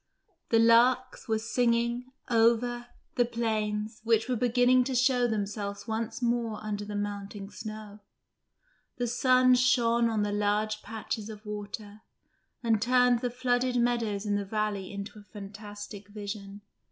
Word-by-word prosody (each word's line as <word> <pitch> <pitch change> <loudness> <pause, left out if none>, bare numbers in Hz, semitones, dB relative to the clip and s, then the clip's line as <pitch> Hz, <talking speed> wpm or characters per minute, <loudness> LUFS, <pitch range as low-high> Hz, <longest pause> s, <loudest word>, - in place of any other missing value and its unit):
The 230 - +4
larks 240 +3 +4
were 220 -1 +1
singing 235 +2 0 0.2
over 240 +1 +2 0.3
the 245 - +5
plains, 215 -2 -2
which 225 0 +2
were 255 - 0
beginning 245 +1 +4
to 265 0 -2
show 250 0 +3
themselves 205 -1 -3
once 225 +2 -3
more 235 -2 0
under 210 -1 -3
the 205 0 -6
melting 205 0 -5
snow; 215 -1 -8 1.0
the 245 - 0
sun 255 +1 +4
shone 240 -2 +3
on 215 -2 0
the 205 - -1
large 210 +1 0
patches 220 0 -5
of 215 0 -10
water, 210 0 -7 0.6
and 225 -3 +2
turned 250 0 +4
the 245 0 -1
flooded 250 0 0
meadows 235 -4 0
in 205 - 0
the 205 0 0
valley 205 -1 -2
into 200 +1 -7
a - - -14
fantastic 205 0 -9
vision. 205 -1 -7
225 Hz, 140 wpm, -29 LUFS, 205-240 Hz, 1.0 s, the